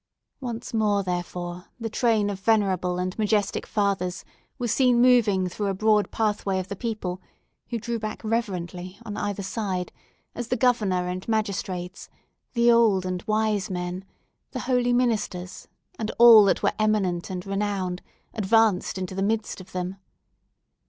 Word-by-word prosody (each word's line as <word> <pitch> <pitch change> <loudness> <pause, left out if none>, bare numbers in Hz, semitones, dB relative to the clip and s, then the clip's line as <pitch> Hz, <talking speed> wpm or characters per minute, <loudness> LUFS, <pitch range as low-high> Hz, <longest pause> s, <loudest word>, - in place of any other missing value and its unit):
Once 240 -3 -6
more, 210 -3 +2
therefore, 175 0 -4
the 230 - -3
train 220 -2 +1
of 195 - -6
venerable 190 -4 +1
and 185 +1 -2
majestic 210 -1 0
fathers 195 -3 -1 0.3
were 245 -2 -2
seen 245 +1 +3
moving 230 -7 +4
through 200 +3 -3
a 195 - -1
broad 210 +1 +3
pathway 210 -3 0
of 185 0 -4
the 200 - -4
people, 195 -5 -4 0.5
who 235 - -2
drew 230 +1 -3
back 215 0 -5
reverently, 185 -5 -3
on 210 -2 -5
either 205 -1 -3
side, 190 -3 -3 0.4
as 240 -1 -5
the 250 - 0
Governor 210 -7 +2
and 180 +1 -5
magistrates, 190 -5 -3 0.4
the 235 -1 +4
old 220 -6 +4
and 180 -1 -2
wise 215 -1 +1
men, 180 0 -4 0.5
the 255 - -3
holy 245 -1 +1
ministers, 215 -7 -1 0.3
and 215 - -2
all 230 -3 +9
that 195 - +1
were - - +2
eminent 200 -5 +1
and 180 -1 -5
renowned, 195 -2 -2 0.3
advanced 215 -3 +2
into 185 0 -4
the 195 - -3
midst 215 -1 -1
of 185 - -15
them. 185 +1 -4
205 Hz, 150 wpm, -25 LUFS, 185-225 Hz, 0.5 s, all